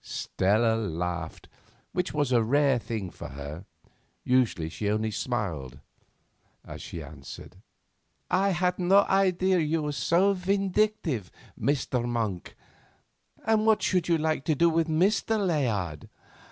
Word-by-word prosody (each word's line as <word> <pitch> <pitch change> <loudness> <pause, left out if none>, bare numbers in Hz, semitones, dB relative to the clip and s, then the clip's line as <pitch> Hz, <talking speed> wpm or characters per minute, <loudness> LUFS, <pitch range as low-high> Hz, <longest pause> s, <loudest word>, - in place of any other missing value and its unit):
Stella 110 +4 +1
laughed, 90 -5 -4 0.4
which 180 0 -1
was 145 -3 0
a 120 -2 +4
rare 135 +2 +3
thing 110 -3 -4
with - - -21
her—usually 80 - -3
she 100 +5 -3
only 110 +1 0
smiled—as 85 - -7
she 85 - -7
answered: 70 -1 -11 0.7
"I 195 +2 +2
had 180 0 0
no 190 +3 +5
idea 190 -1 +2
you 155 0 0
were 150 - -1
so 175 +7 +2
vindictive, 195 - 0 0.3
Mr. 135 -3 0
Monk. 115 -7 -3 0.9
And 220 0 +3
what 220 -1 +3
would 180 -2 +1
you 170 -1 +3
like 155 -3 -1
to 155 - +2
do 170 +4 +4
with 165 0 +1
Mr. 195 +7 +2
Layard?" 115 - -1
140 Hz, 125 wpm, -27 LUFS, -, 0.9 s, no